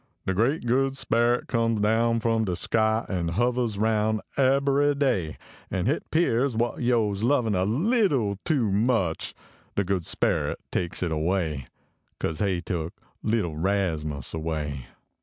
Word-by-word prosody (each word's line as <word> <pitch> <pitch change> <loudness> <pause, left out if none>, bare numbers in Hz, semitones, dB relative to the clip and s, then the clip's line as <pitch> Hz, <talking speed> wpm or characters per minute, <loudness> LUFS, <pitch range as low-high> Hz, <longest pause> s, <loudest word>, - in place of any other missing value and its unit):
De 95 - 0
Great 120 - +1
Good 135 +3 +1
Speret 120 0 +2
comes 115 -2 0
down 115 +2 +2
from 115 -1 +1
de 90 -3 -1
sky 110 +4 +1
An 85 -3 -2
hovahs 120 0 0
aroun 110 0 +1 0.2
ebbery 140 +1 +3
day, 100 - 0 0.3
An 95 -1 -1
hit 140 +7 -1
pears 135 -6 +2
what 120 +3 -1
yo 120 -4 +2
s 100 0 -4
lovin 120 -3 +2
a 95 -1 +1
leetle 135 - +1
too 130 -11 +1
much, 100 -5 0 0.4
De 100 - +2
good 95 -2 -1
speret - - 0
takes 90 +1 -2
it 85 - -1
away. 80 -4 -1 0.5
Kase 80 - -2
he 95 -4 0
took 85 -2 -3 0.3
leetle 105 -8 0
Rasmus 80 -6 -1
away. 75 -5 -3
110 Hz, 145 wpm, -26 LUFS, 90-120 Hz, 0.5 s, ebbery